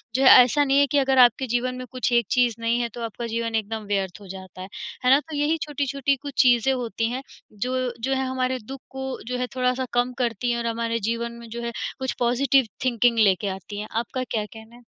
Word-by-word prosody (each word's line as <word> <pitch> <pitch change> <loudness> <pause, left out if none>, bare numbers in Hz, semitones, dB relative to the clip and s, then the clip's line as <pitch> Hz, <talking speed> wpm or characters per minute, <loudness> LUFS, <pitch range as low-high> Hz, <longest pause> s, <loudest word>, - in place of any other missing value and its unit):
जो 270 - +2
है 260 - +8
ऐसा 290 +4 +2
नहीं 275 0 +3
है 285 - +4
कि 290 - +2
अगर 270 -1 +2
आपके 250 +3 +2
जीवन 245 +2 -1
में 255 - -6
कुछ 255 -1 -1
एक 235 -1 +3
चीज़ 245 -3 +3
नहीं 230 +1 0
है, 235 - -2
तो 235 +2 -9
आपका 230 +2 -6
जीवन 230 0 -2
एकदम 220 0 -2
व्यर्थ 195 -1 -2
हो 195 - -12
जाता 185 -1 -10
है, 190 - -7 0.4
है 255 - +5
ना? 275 - +7
तो 305 0 -9
यही 300 +3 +1
छोटी-छोटी 280 -1 -1
कुछ 285 -2 -7
चीज़ें 250 +1 +4
होती 230 -2 -2
हैं, 260 +2 -3 0.3
जो 255 +3 -2
जो 270 +3 0
है 265 0 0
हमारे 255 0 -1
दुःख 270 0 -7
को 265 0 -5 0.2
जो 250 0 -2
है 250 - -2
थोड़ा-सा 255 0 0
कम 245 +1 +1
करती 240 +1 -1
है 235 - 0
और 235 0 -2
हमारे 230 0 -1
जीवन 235 0 -2
में 235 - -10
जो 235 +1 -6
है 235 - -3 0.3
कुछ 260 -1 -2
पॉज़िटिव 255 +1 +3 0.2
थिंकिंग 235 -1 +2
लेके 200 -1 +3
आती 205 +2 -8
हैं, 215 - -5
आपका 240 +3 -2
क्या 215 -2 -1
कहना 220 +2 -14
है? 245 - -17
245 Hz, 240 wpm, -24 LUFS, 230-260 Hz, 0.4 s, है